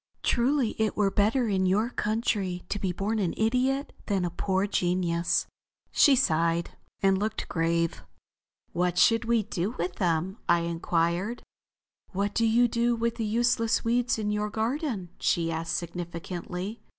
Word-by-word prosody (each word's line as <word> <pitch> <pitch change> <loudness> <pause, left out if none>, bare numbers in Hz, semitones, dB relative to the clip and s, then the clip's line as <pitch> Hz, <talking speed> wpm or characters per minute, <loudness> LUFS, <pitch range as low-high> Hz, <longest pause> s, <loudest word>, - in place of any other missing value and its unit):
Truly 250 0 +2
it 220 -1 0
were 200 -2 +2
better 225 +5 +2
in 190 -3 +1
your 210 +6 +1
country 210 -5 -1
to 205 - -2
be 190 -2 -1
born 205 +5 -2
an 180 -5 -1
idiot 255 +5 +1
than 195 -4 +1
a 175 - -2
poor 190 +2 0
genius." 175 -3 +1 0.5
She 280 - +6
sighed 170 -7 +1 0.3
and 195 -1 +4
looked 215 +1 -2
grave. 165 - 0 0.7
"What 180 0 0
should 225 +5 +4
we 230 -1 +2
do 205 +2 -3
with 175 +1 -3
them?" 180 +4 0
I 170 0 +4
inquired. 170 +5 -1 0.7
"What 200 +2 -1
do 230 -1 +2
you 235 +2 +4
do 235 +1 +1
with 230 0 -1
the 225 - -1
useless 230 +1 +1
weeds 240 +1 +1
in 210 -1 -1
your 210 0 -1
garden," 225 - -2
she 165 -1 +1
asked 165 +1 -2
significantly. 175 +4 -5
200 Hz, 150 wpm, -27 LUFS, 175-230 Hz, 0.7 s, She